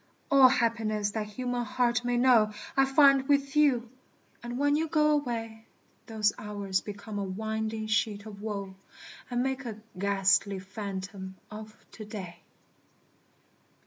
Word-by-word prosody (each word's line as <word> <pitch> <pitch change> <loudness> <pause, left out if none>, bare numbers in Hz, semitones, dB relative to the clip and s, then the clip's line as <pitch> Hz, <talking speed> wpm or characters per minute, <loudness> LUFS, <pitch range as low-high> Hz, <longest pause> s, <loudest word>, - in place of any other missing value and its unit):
All 270 -2 +8
happiness 220 -4 0
that 215 0 -3
human 245 +3 -3
heart 240 +1 0
may 245 0 0
know 240 -4 +5 0.2
I 270 - +5
find 275 -1 +5
with 280 -1 +1
you; 255 -6 +3 0.5
and 240 +1 -5
when 285 +1 +2
you 320 +2 0
go 305 -1 +3
away, 225 -6 -2 0.4
Those 215 -2 +1
hours 200 -2 -2
become 205 0 -7
a - - -1
winding 220 +3 -3
sheet 215 -1 0
of 205 -2 -10
woe, 200 -3 -4 0.6
And 245 0 0
make 265 0 -2
a 220 -3 -6 0.2
ghastly 195 0 +2
phantom 190 0 -6 0.2
of 215 0 -9
To 215 - -9
day. 190 -5 -8
220 Hz, 140 wpm, -29 LUFS, 205-250 Hz, 0.6 s, All